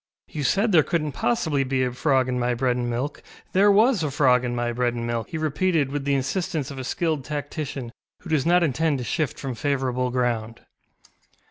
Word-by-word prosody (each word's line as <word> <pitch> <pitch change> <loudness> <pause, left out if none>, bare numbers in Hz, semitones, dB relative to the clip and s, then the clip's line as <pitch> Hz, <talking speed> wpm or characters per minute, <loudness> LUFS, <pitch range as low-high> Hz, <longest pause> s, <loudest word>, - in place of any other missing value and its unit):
ŌĆ£You 150 - -4
said 200 - +2
there 165 -4 +6
couldnŌĆÖt 155 -2 -1
possibly 135 +4 0
be 130 0 0
a 125 - 0
frog 130 0 +1
in 125 -1 -1
my 120 0 0
bread 125 0 +1
and 120 -1 -2
milk; 130 +5 -3 0.3
there 200 +2 +5
was 220 +1 +4
a 155 - 0
frog 130 -3 +3
in 120 -1 -2
my 120 0 -1
bread 120 0 0
and 115 0 -3
milk, 115 -1 -2
ŌĆØ - - -26
he 160 - -4
repeated, 155 -1 0
with 145 -1 -3
the 140 -1 +2
insistence 145 +1 -2
of 135 - -7
a - - -4
skilled 155 +1 -1
tactician 145 -3 -5 0.3
who 180 - -10
does 150 -4 +2
not 175 +1 +4
intend 155 0 +1
to 125 - -4
shift 150 +2 -2
from 135 -2 -4
favourable 130 -1 -1
ground. 120 -2 -2
135 Hz, 215 wpm, -24 LUFS, 125-155 Hz, 0.3 s, there